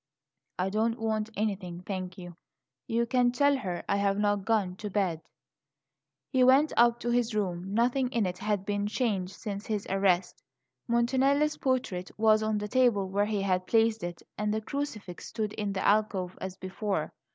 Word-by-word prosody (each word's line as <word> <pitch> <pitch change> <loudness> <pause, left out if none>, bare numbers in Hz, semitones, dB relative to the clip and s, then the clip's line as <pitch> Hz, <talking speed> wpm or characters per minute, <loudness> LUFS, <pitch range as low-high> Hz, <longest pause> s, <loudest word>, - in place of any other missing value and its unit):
"I 185 +1 -1
don't 225 +3 +1
want 220 -1 -1
anything, 190 -5 -2
thank 185 -2 -4
you; 175 -2 -9 0.5
you 235 +1 +1
can 245 +1 +2
tell 285 +3 +3
her 185 -8 -4
I 200 - +1
have 200 0 +1
not 205 -1 +1
gone 205 -5 +1
to 210 - -5
bed." 185 -5 0 1.1
He 255 - +4
went 270 +4 +5
up 235 0 +4
to 240 - -1
his 240 -2 +1
room. 190 -1 -2
Nothing 245 +2 +2
in 230 -5 +1
it 180 0 -3
had 205 -2 -1
been 205 0 -1
changed 205 -5 -1
since 200 -1 -6
his 210 -2 -2
arrest; 190 -2 +1 0.5
Montanelli's 265 +5 +2
portrait 245 -9 -1
was 215 0 +4
on 215 0 0
the 210 0 -3
table 230 -5 +2
where 200 +2 +1
he 210 -2 -1
had 185 -1 0
placed 225 -2 +2
it, 175 -1 -5 0.2
and 210 0 0
the 215 - 0
crucifix 220 -8 -5
stood 215 -2 -3
in 205 -1 -2
the 190 - -2
alcove 200 -3 +1
as 190 0 -5
before. 195 +2 -3
210 Hz, 175 wpm, -29 LUFS, 190-235 Hz, 1.1 s, went